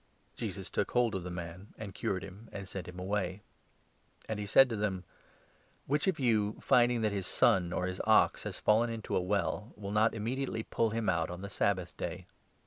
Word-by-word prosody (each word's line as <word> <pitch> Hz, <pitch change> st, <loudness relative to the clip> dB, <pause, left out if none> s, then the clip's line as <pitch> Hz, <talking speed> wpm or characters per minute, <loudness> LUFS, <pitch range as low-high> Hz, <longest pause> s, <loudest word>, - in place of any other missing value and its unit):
Jesus -, -, -5 dB
took -, -, 0 dB
hold 120 Hz, -2 st, +2 dB
of 95 Hz, -, -2 dB
the 90 Hz, -, -5 dB
man 90 Hz, +2 st, -7 dB
and 100 Hz, -3 st, -7 dB
cured 95 Hz, -1 st, -2 dB
him, 100 Hz, +4 st, -11 dB
and 100 Hz, -1 st, -6 dB
sent 95 Hz, 0 st, -6 dB
him 90 Hz, 0 st, -9 dB
away. 95 Hz, 0 st, -2 dB, 0.8 s
And 110 Hz, -1 st, -3 dB
he 105 Hz, -, -4 dB
said 135 Hz, +6 st, +7 dB
to 115 Hz, -, -2 dB
them: 100 Hz, -3 st, -1 dB, 0.4 s
" -, -, -35 dB
Which 145 Hz, +6 st, 0 dB
of 185 Hz, -5 st, +1 dB
you, 110 Hz, -5 st, +2 dB
finding 120 Hz, -1 st, +4 dB
that 110 Hz, -1 st, +2 dB
his 100 Hz, -3 st, -3 dB
son 90 Hz, -2 st, +3 dB
or 90 Hz, -, -1 dB
his 90 Hz, 0 st, -3 dB
ox -, -, +4 dB
has -, -, -5 dB
fallen 115 Hz, +3 st, +3 dB
into 115 Hz, -2 st, -3 dB
a -, -, +3 dB
well, 100 Hz, +3 st, -1 dB
will 100 Hz, -1 st, -6 dB
not 110 Hz, +2 st, +3 dB
immediately 115 Hz, +1 st, -2 dB
pull 115 Hz, 0 st, 0 dB
him 115 Hz, 0 st, -2 dB
out 85 Hz, -2 st, +1 dB
on 90 Hz, +1 st, -6 dB
the 100 Hz, -, -6 dB
Sabbath 95 Hz, -3 st, 0 dB
Day?" -, -, -4 dB
105 Hz, 210 wpm, -32 LUFS, 95-115 Hz, 0.8 s, said